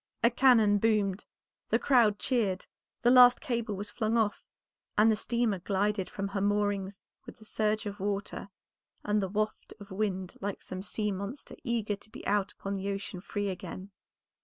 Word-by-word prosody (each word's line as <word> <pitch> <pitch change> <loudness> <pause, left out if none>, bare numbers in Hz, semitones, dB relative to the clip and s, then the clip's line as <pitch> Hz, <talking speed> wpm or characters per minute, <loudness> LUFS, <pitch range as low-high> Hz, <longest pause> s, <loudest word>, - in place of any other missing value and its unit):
A 235 - +5
cannon 225 -5 +5
boomed, 210 -3 +1 0.4
the - - +4
crowd 235 -6 +4
cheered, 210 -8 0 0.4
the 240 - +5
last 250 -1 +8
cable 235 -7 -2
was 205 +2 -5
flung 220 +1 0
off, 215 -2 0 0.5
and 220 +2 +6
the - - +3
steamer 225 -2 0
glided 200 +1 0
from 195 0 -4
her 195 0 -2
moorings 205 -1 0 0.2
with - - -10
the 215 - -12
surge 215 +1 0
of 205 0 -5
water 200 0 -3 0.5
and 210 0 +1
the 190 - -2
waft 215 +2 -3
of 200 -1 -12
wind 190 -2 -2
like 200 0 -4
some 185 0 -6
sea 210 +1 -2
monster 200 +8 -6
eager 230 -5 -1
to 205 - -16
be - - -11
out 200 0 +1
upon 195 - -5
the 195 0 -3
ocean 195 -2 -4
free 205 +1 -3
again. 190 +1 -7
205 Hz, 175 wpm, -30 LUFS, 195-220 Hz, 0.5 s, last